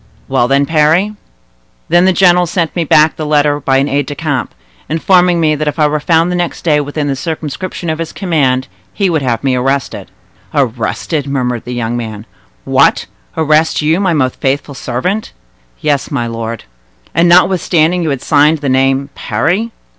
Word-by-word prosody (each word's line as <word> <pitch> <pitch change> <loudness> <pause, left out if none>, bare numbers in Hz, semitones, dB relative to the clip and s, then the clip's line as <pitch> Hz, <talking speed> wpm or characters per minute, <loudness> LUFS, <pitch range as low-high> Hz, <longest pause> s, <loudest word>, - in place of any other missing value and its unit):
"Well—then, 135 +4 +2
Parry." 160 +7 +2 0.7
"Then 175 +2 +4
the 190 - +4
general 180 -1 +4
sent 170 -1 -2
me 170 - 0
back 155 0 +4
the 155 - -4
letter 145 -1 +2
by 135 -1 +1
an 135 +1 +1
aide 140 -1 -1
de 145 - -5
camp, 145 -5 -3 0.3
informing 175 +2 +3
me 155 -2 +2
that 150 0 -2
if 150 - -2
I 155 - +3
were 150 +1 0
found 165 +3 +2
the - - -1
next 175 -1 -3
day 150 -3 +2
within 145 +1 -3
the 140 -1 -1
circumscription 160 +5 -5
of 160 0 -2
his 165 - -4
command, 140 -9 0 0.2
he 195 -3 0
would 160 -3 0
have 120 -3 -1
me 135 -2 +1
arrested." 135 +1 -2 0.5
"Arrested!" 135 +3 -1
murmured 125 -4 -2
the 125 - -5
young 120 0 -2
man. 110 -2 -6 0.4
"What! - - +3 0.3
arrest 155 0 +2
you, 160 +4 +2
my 190 -3 +1
most 130 -5 0
faithful 140 +2 -1
servant?" 135 - -3 0.5
"Yes, 145 -3 0
my 130 -5 -2
lord." 115 - -5 0.5
"And 170 +1 +3
notwithstanding 180 -1 +3
you 165 - -1
had 135 -3 -3
signed 150 +2 +3
the 145 -2 -3
name 135 +1 +1
Parry?" 175 - -1
150 Hz, 175 wpm, -13 LUFS, 135-165 Hz, 0.7 s, Then